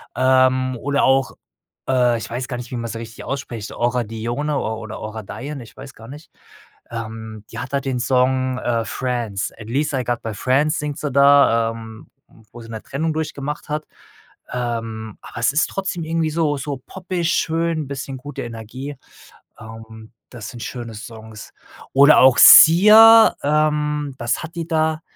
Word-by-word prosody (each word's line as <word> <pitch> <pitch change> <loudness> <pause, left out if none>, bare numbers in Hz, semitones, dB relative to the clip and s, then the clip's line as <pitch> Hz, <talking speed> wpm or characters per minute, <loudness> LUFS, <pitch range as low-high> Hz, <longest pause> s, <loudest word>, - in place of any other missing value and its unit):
Ähm, 130 0 +2
oder 140 +3 -1
auch, 135 -1 +2 0.6
äh, 125 -2 +2
ich 110 - -7
weiß 125 +2 -4
gar 125 - -4
nicht, 120 0 -9
wie - - -4
man 115 0 -5
sie - - -6
richtig 115 0 -10
ausspricht, 120 -6 -6
Aura 120 0 0
Dione 120 +7 -3
or 110 -3 -3
oder 110 -1 -8
Aura 110 +1 -7
Dione, 140 +6 -7
ich 115 - -16
weiß 135 -1 -11
gar 115 +2 -14
nicht. 150 +3 -12 0.6
Ähm, 110 -2 -7
die - - -7
hat 125 +3 -7
halt 140 - 0
den 130 -2 -2
Song, 130 +1 +1
äh, 115 -2 -1
„Friends“, 120 -7 -3
at 110 - -10
least 145 +4 -1
I 130 -2 -1
got 120 -1 -1
my 110 -2 -4
friends 140 +8 +1
singt 150 -1 -4
sie 145 -3 -4
da, 140 -5 +4
ähm, 110 -1 -11 0.5
wo 120 - -10
sie 115 - -12
'ne 110 -1 -7
Trennung 160 +4 -3
durchgemacht 150 -2 -5
hat. 150 +1 -3 0.7
Ähm, 115 -3 -4
aber - - -12
es 115 - +2
ist 150 +4 +1
trotzdem 190 -3 -4
irgendwie 160 -1 -1
so 150 -2 0
so 140 0 -5
poppig, 180 -2 -3
schön, 165 -2 -1
bisschen 135 -1 -6
gute 145 +3 -8
Energie. 120 +5 -8 0.6
Ähm, 110 0 -12 0.2
das 110 -4 -8
sind 120 +1 -9
schöne 120 -3 -7
Songs. 110 0 -11 0.4
Oder 140 +3 +7
auch 130 -1 +6
Sia, 220 +6 +9
ähm 150 -1 0
was 120 0 -2
hat 160 +1 -9
die 165 -1 -4
da? 160 -1 0
130 Hz, 175 wpm, -20 LUFS, 115-150 Hz, 0.7 s, Sia